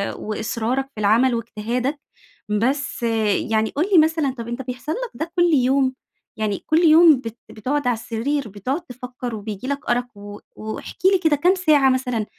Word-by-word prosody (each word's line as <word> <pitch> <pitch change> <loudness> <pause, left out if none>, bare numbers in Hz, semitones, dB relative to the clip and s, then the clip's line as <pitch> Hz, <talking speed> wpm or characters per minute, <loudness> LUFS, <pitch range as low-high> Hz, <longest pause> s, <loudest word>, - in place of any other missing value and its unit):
وإصرارك 225 +4 -2
في - - -7
العمل 235 +5 +3
واجتهادك، 235 +5 -3 0.5
بس 260 +4 -1 0.5
يعني 220 0 +2
قُل 310 +6 0
لي 340 - +8
مثلًا 310 -4 +1
طب 230 - -6
أنت 240 +2 -4
بيحصل 250 +4 -5
لك - - -5
ده 330 +1 -4
كل 345 -1 +4
يوم، 260 0 +2 0.4
يعني 210 -2 -1
كل 315 +1 +3
يوم 320 -1 +7
بت 225 +1 -6
بتقعد 255 +5 -2
على 245 - +3
السرير 235 +3 -3
بتقعد 255 - -3
تفكّر 250 -4 -7
وبييجي 210 +3 -6
لك 280 -2 -3
أرق 245 +1 +1
و 205 0 -10 0.2
واحكِ 220 0 -7 0.2
لي 380 - +3
كده 320 -4 +3
كام 360 +7 +3
ساعة 300 -7 +4
مثلًا 250 -4 -1
255 Hz, 170 wpm, -21 LUFS, 225-290 Hz, 0.5 s, لي